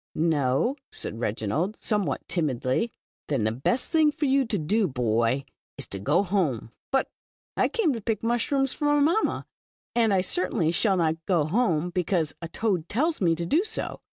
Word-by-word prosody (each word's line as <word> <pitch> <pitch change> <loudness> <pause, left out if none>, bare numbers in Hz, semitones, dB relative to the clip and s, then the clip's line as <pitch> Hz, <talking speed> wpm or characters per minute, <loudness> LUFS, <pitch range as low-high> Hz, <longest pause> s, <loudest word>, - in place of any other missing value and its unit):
" - - -76
"No," 155 - +1
said 115 - -3
Reginald, 120 - -1
somewhat 205 - -2
timidly. 155 - 0 0.4
*'Then 135 -7 0
the 110 - +2
best 140 - -1
thin.^ 315 -2 +4
for 295 0 -2
vou 270 0 +3
to 220 - 0
do. 195 +6 +1
bov, 120 0 0 0.3
is - - -3
to 100 - -4
go 150 - +2
home. 170 - -1
" - - -68
'* - - -87
But, 270 - +2 0.5
I - - +3
came 430 - +1
to 230 - -5
pick 215 0 -2
mushrooms 255 +3 +1
for 295 - -1
mv 290 0 +4
mamma, 345 +9 +1 0.5
and 230 -3 +3
I 190 -2 +3
certainly 180 -3 0
shall 195 +2 +2
not 160 -1 0
go 175 -5 +3
home 175 -2 +1
because 175 -3 0
a 165 - -4
toad 180 -2 -1
tells 305 +7 0
me 165 -3 +3
to 170 +1 -3
do 315 - +2
so. 440 +1 -4
180 Hz, 190 wpm, -26 LUFS, 150-240 Hz, 0.5 s, thin.^